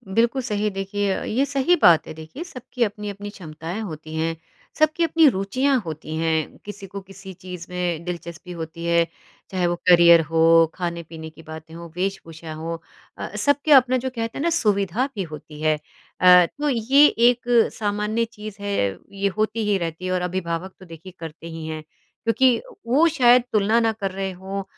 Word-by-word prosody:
बिल्कुल 235 +3 +2
सही। 210 -4 -1
देखिए 195 0 -2
अ, - - -4
ये 260 +6 0
सही 280 +5 +2
बात 165 -2 +6
है - - -7
देखिए, 160 - -9
सबकी 255 -6 -4
अपनी-अपनी 205 -1 -4
क्षमताएँ 170 +1 -7
होती 155 -5 -7
हैं, 165 +1 -1 0.4
सबकी 310 +2 +3
अपनी 325 -1 +5
रुचियाँ 255 +8 +1
होती 155 0 -6
हैं, 160 -1 -1
किसी 205 -1 -8
को 200 +1 -7
किसी 195 0 -10
चीज़ 180 -1 -9
में 175 -2 -2
दिलचस्पी 170 0 -7
होती 165 0 -7
है, 170 0 +3 0.4
चाहे 180 -2 0
वो 175 - 0
करियर 170 -1 +8
हो 165 0 +5
खाने-पीने 170 -2 -5
की 160 - -16
बातें 160 0 -10
हो, 170 0 -8
वेशभूषा 165 -4 -4
हो 165 +2 -4 0.4
अ - - -6
अ, - - -9
सब 285 0 +3
के 305 - +1
अपना 255 -2 +6
जो 260 +1 -3
कहते 230 -2 -5
हैं 285 - -2
ना 340 - +2
सुविधा 210 - +1
भी 195 - -2
होती 150 -1 -10
है। 155 0 +3 0.5
अ, 180 -1 +8
तो 295 - -3
ये 270 +4 +5
एक, 240 +1 +3 0.3
सामान्य 210 +2 -1
चीज़ 215 -2 -10
है, 200 - -1
ये 200 0 -1
होती 215 0 0
ही 200 - +3
रहती 170 +1 -5
है 185 - -2
और 180 -1 0
अभिभावक 180 0 -3
तो 185 - -13
देखिए 165 +2 -11
करते 165 0 -8
ही 165 -1 -7
हैं, 155 -1 -5 0.4
क्योंकि 235 +1 +3 0.3
वो 295 +8 +4
शायद 245 -4 +5
तुलना 215 +2 +3
ना 225 -1 +2
कर 200 -3 -4
रहे 195 0 -3
हों। 190 +2 -6
190 Hz, 185 wpm, -23 LUFS, 165-230 Hz, 0.5 s, करियर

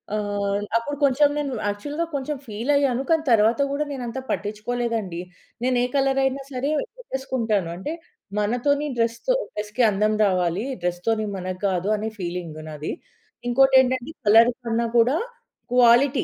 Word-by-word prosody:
ఆహ్, 205 -1 -1 0.2
అప్పుడు 285 +5 -3
కొంచెం 285 +2 +4
నేను 280 -3 -2
యాక్చువల్‌గా 290 +11 -2
కొంచెం 280 +2 -2
ఫీల‌య్యాను. 260 +4 +1
కానీ 320 -1 +3
తర్వాత 225 +4 +4
గూడా 295 +1 -1
నేనంత 255 -2 -4
పట్టిచ్చుకోలేదండి. 215 -3 -2 0.4
నేనే 250 -1 +2
కలర‌యినా 270 0 +2
సరే 265 +3 -2 0.3
పెట్టేసుకుంటాను. 240 - -2
అంటే 290 - -4 0.5
మనతోని 250 +8 +1
డ్రెస్‌తో 235 - +1 0.2
డ్రెస్‌కి 210 +4 -1
అందం 210 +1 +1
రావాలి 185 +2 0 0.2
డ్రెస్‌తోని 195 +5 0
మనగ్గాదు 185 +1 -2
అనే 220 +1 -3
ఫీలింగ్ 175 -3 -5
నాది. 150 0 -5 0.6
ఇంకోటేంటంటే 260 +1 +4 0.2
కలర్ 225 +3 +7 0.2
కన్నా 230 0 0
గూడా 245 +5 +4 0.6
క్వాలిటీ 250 +3 +5
235 Hz, 120 wpm, -23 LUFS, 205-270 Hz, 0.6 s, కలర్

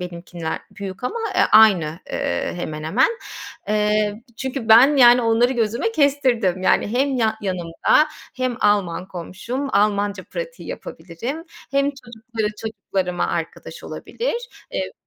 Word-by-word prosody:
benimkinden 170 -2 -5
büyük 195 +2 -7
ama, 445 - -2 0.2
eee, - - +4
aynı, 180 -8 +6
eee, - - -2
hemen 155 -3 -5
hemen. 160 - +3 0.6
Eee, 210 0 +1
çünkü 265 -1 -4
ben, 250 +7 +7
yani, 245 -1 +7
onları 230 +2 +3
gözüme 235 - 0
kestirdim. 255 - +2
Yani, - - +3
hem 265 +4 +1
ya 220 -2 +1
yanımda 185 - +2 0.3
hem 255 -2 -1
Alman 190 -3 +1
komşum, 195 +10 -5
Almanca 205 -2 +1
pratiği - - -7
yapabilirim, 210 - -6 0.3
hem 275 +1 +2
çocukları 235 -4 -5
çocuklarıma 195 -4 -2
arkadaş - - -5
olabilir. 480 +1 -4 0.2
Eee, - - -3
220 Hz, 125 wpm, -21 LUFS, 185-255 Hz, 0.6 s, ben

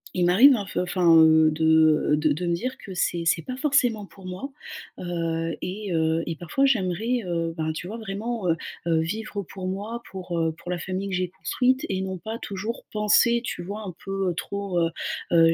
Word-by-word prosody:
Il 180 -1 +2
m'arrive, 235 +11 +7
hein, 205 -4 -3
f - - -7
enfin, 175 -3 +5
de, 160 0 +4 0.5
heu, - - +4
de 155 0 +2
de 175 +4 -3
me 170 - +1
dire 255 +9 -4
que 190 -2 -9
c'est 170 -1 0
c'est 165 0 +2
pas 255 - -5
forcément 255 -7 +2
pour 195 -1 -15
moi. 185 +10 -6 0.5
Heu, 165 -2 -2
et 195 +1 -4
heu, 160 0 +1
et 165 - -2
parfois, 175 - 0
j'aimerais, 225 0 +1
heu, 165 -2 -1
ben, 160 0 -1
tu 165 - -6
vois, 220 +4 -6
vraiment, 220 -1 -3
heu 165 - +2 0.3
heu, 165 -1 +3
vivre 205 +4 -4
pour 185 +1 -7
moi, 210 +5 -4
pour, 180 -2 -5
heu, 165 0 +1
pour 180 - -7
la 180 - -2
famille 190 +3 -3
que - - -4
j'ai 180 0 -1
construite 260 - 0
et 190 - -1
non 190 -1 -3
pas 220 +6 -6
toujours 210 +4 -5
penser, 220 +3 +4
tu 175 - -4
vois? 205 +4 -6
Un 180 - -6
peu, 195 -1 -1
heu, - - -3
trop, 200 0 -3
heu 165 -1 +2 0.4
heu, 165 -1 +6
185 Hz, 210 wpm, -25 LUFS, 170-215 Hz, 0.5 s, m'arrive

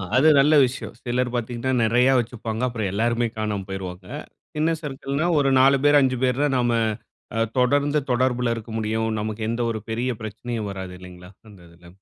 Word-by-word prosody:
அது 135 +5 +5
நல்ல 145 +3 +4
விஷயம். 130 +2 -6
சிலர் 125 0 0
பார்த்தீங்கனா 120 +2 -2
நெறைய 120 +3 +3
வச்சுப்பாங்க. 115 -1 -4
அப்புறம் 110 -5 -3
எல்லாருமே 115 +3 +1
காணாம 105 -3 -2
போய்ருவாங்க. 95 -1 -6 0.5
சின்ன 160 +2 +1
சர்க்கிள்னா 140 +1 -3
ஒரு 140 -1 +2
4 135 +1 +5
பேர், 145 0 +6
5 130 -1 +1
பேர் 130 +1 +1
தான் 145 -2 +1
நாம 120 -1 +1 0.9
தொடர்ந்து 145 +4 +2
தொடர்பில 125 -1 +1
இருக்க 115 0 -8
முடியும். 110 +1 -1
நமக்கு 110 +1 -4
எந்த 115 +1 -2
ஒரு 110 -1 -4
பெரிய 120 +3 -1
பிரச்சனையும் 110 0 -5
வராது 95 -2 -7
இல்லைங்களா? 90 0 -12 0.2
அந்த 100 -3 -15
இதில. 85 +1 -18
120 Hz, 165 wpm, -23 LUFS, 110-130 Hz, 0.9 s, பேர்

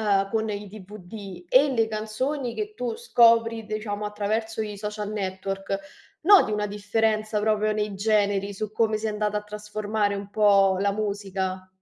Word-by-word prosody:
a 195 -2 +2
con 220 0 0
il 205 0 -5
DVD 195 -2 -10
e 270 +7 +5
le 225 -3 +2
canzoni 235 +5 -3
che 425 0 -4
tu 245 - -3
scopri, 230 - +3
diciamo, 215 -1 -4
attraverso 220 +2 -2
i 210 -1 -5
social 210 0 -4
network, 195 -1 -3 0.4
noti 380 - +6
una 210 0 -1
differenza 215 +1 0
proprio 215 0 +1
nei 210 -2 -2
generi, 205 -1 +1
su 210 +1 -4
come 220 0 +1
si 215 +1 -3
è - - 0
andata 210 0 -1
a - - -7
trasformare 210 0 -2
un 200 0 -6
po' 200 -2 +4
la 200 +1 +1
musica? 195 -3 -3
210 Hz, 165 wpm, -25 LUFS, 200-220 Hz, 0.4 s, noti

